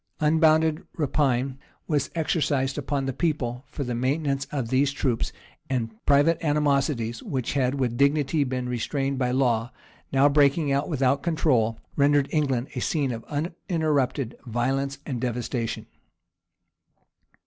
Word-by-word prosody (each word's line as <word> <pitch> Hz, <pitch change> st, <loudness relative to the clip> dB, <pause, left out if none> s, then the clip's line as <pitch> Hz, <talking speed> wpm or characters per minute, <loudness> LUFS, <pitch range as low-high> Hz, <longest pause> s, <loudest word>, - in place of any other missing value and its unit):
Unbounded 160 Hz, +1 st, +3 dB, 0.2 s
rapine 135 Hz, -3 st, 0 dB, 0.3 s
was 150 Hz, -3 st, 0 dB
exercised 145 Hz, -4 st, 0 dB
upon 140 Hz, -1 st, -2 dB
the 135 Hz, -, -2 dB
people 130 Hz, -5 st, -2 dB
for 140 Hz, -, -5 dB
the 125 Hz, -2 st, -3 dB
maintenance 140 Hz, +3 st, 0 dB
of 130 Hz, -6 st, -4 dB
these 135 Hz, +2 st, +2 dB
troops; 130 Hz, -4 st, -1 dB, 0.4 s
and 120 Hz, -4 st, -1 dB, 0.2 s
private 145 Hz, +4 st, +4 dB
animosities, 140 Hz, -6 st, +1 dB
which 130 Hz, -4 st, -3 dB
had 130 Hz, -1 st, +1 dB
with 125 Hz, -4 st, -1 dB
difficulty 140 Hz, +1 st, +2 dB
been 125 Hz, -1 st, -3 dB
restrained 135 Hz, +3 st, -2 dB
by 125 Hz, -1 st, +1 dB
law, 120 Hz, -2 st, +1 dB, 0.4 s
now 135 Hz, +1 st, +5 dB
breaking 145 Hz, +1 st, +3 dB
out 140 Hz, +2 st, 0 dB
without 135 Hz, -2 st, +1 dB
control, 130 Hz, -10 st, +1 dB, 0.2 s
rendered 145 Hz, -1 st, +3 dB
England 135 Hz, -5 st, 0 dB
a 125 Hz, -, -3 dB
scene 140 Hz, 0 st, 0 dB
of 115 Hz, -1 st, -5 dB
uninterrupted 150 Hz, -, -1 dB
violence 135 Hz, +3 st, -1 dB
and 125 Hz, -5 st, -4 dB
devastation. 120 Hz, -1 st, -2 dB
140 Hz, 130 wpm, -25 LUFS, 125-150 Hz, 0.4 s, now